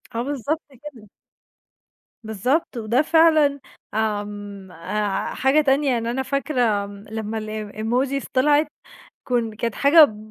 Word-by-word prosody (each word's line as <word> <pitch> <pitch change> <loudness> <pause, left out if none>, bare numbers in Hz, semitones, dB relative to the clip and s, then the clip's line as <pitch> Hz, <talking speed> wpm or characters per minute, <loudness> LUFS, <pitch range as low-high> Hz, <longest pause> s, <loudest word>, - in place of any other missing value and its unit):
آه، 230 - 0
بالضبط 290 +3 -2
كده. 260 -5 -13 1.1
بالضبط. 250 - -1
وده 230 +4 +1
فعلًا، 310 -3 +4 0.3
آمم، 205 -3 -4
آآ 195 +4 -3
حاجة 270 +4 +3
تانية، 280 0 +2
يعني 235 -1 -1
أنا 265 +2 -2
فاكرة 250 -7 0
م 200 +1 -11
لما 220 0 -4
ال 215 -1 -5
الemojis 255 +5 -1
طلعت 290 +3 +3 0.6
كُن 235 -3 -1
كانت 230 0 -2
حاجة 285 -5 +6
235 Hz, 120 wpm, -22 LUFS, 215-280 Hz, 1.1 s, حاجة